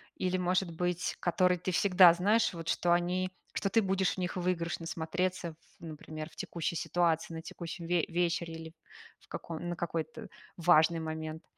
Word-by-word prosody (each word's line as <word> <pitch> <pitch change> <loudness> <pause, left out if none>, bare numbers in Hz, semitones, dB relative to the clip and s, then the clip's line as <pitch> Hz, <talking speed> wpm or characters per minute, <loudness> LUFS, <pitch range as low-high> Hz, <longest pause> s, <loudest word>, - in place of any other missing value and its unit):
или, 185 0 0
может 180 0 +1
быть, 180 +1 -1
которые 180 +1 +2
ты 185 - -2
всегда 180 -2 +7
знаешь, 205 +5 +2
вот 165 -1 -7
что 175 -1 +2
они 180 +1 0 0.2
что 195 - 0
ты 225 +2 +3
будешь 190 -1 +1
в - - -26
них 180 0 -2
выигрышно 175 -2 -2
смотреться 175 +1 -2 0.3
в, - - -17
например, 155 0 -7
в - - -19
текущей 170 0 -3
ситуации, 165 -1 0
на 160 - -6
текущем 170 0 -7
ве 175 -1 +2
вечере 170 -1 -1
или 160 0 -9 0.5
в - - -24
каком 170 +1 -6
на 175 - -2
какой-то, 170 +8 -4
э, - - -9 0.3
важный 165 -1 +5
момент? 160 0 -5
175 Hz, 175 wpm, -31 LUFS, 165-180 Hz, 0.5 s, всегда